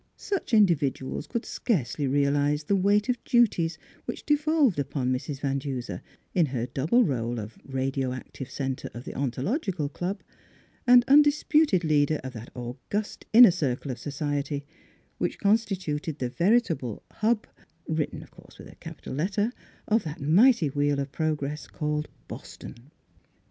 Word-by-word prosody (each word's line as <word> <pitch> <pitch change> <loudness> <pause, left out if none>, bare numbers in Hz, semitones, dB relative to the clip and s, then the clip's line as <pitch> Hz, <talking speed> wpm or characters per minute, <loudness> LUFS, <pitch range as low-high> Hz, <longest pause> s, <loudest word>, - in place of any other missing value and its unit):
Such 395 -9 -3
in 215 -3 +7
dividuals 145 -4 -2
could 235 -1 -3
scarcely 145 - -1
realise 145 +2 +1
the 200 - +1
weight 205 +2 +3
of 250 -1 -1
duties 200 -9 +2 0.3
which - - -6
devolved 295 - +2
upon 135 -2 -1
Mrs 135 +2 -4
Van 140 -1 0
Duser, 125 -9 -5 0.3
in 170 -4 +3
her 125 -3 -2
double 150 - +2
role 120 - -1
of 110 +1 -8
radio 135 -1 -2
active 130 +1 -7
centre 135 -1 -4
of 120 - -7
the - - -6
Ontological 150 - -2
Club 180 +7 -4 0.7
and 245 0 +7
undis 290 +1 +5
puted 300 - +4
leader 150 -1 +2
of 130 -1 -6
that 115 0 -9
august 130 - -5
inner 235 -2 +9
circle 135 -3 -2
of 125 - -6
society 145 0 -3 0.5
which - - -1
constituted 190 -8 0
the 125 -4 -2
veritable 165 - +1 0.2
Hub 220 0 +2 0.4
(written 155 -1 -2
of - - -18
course - - -17
with - - -12
a - - -17
capital - - -9
let 165 +9 -1
ter) 215 +4 0 0.3
of 220 +2 +3
that 155 +1 -6
mighty 170 - +4
wheel 145 0 +1
of 140 0 -3
progress 150 -1 -2
called 150 0 -2 0.2
Boston. - - -9
150 Hz, 155 wpm, -27 LUFS, 135-205 Hz, 0.7 s, inner